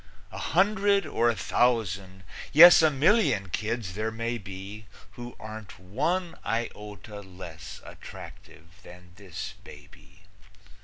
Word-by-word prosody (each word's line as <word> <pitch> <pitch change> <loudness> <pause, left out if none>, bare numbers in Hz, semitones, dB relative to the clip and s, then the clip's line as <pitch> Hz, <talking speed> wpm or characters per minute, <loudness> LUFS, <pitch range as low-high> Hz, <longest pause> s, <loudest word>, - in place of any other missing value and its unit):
A - - -7
hundred 200 +3 +2
or 120 - +1
a 115 - 0
thousand, 100 -5 0 0.3
yes, 170 +3 +10
A 160 - +5
million 145 - +2
kids 110 0 -3
there 110 +3 -2
may 115 +1 -3
be 95 +2 -9 0.2
Who 120 0 -9
aren't 110 -1 -9
one 165 - -2
iota 105 -2 -5
less 90 -5 -10
Attractive 85 +5 -13
than 90 -2 -15
this 95 -5 -7
baby. 75 +5 -16
110 Hz, 115 wpm, -27 LUFS, 95-125 Hz, 0.3 s, yes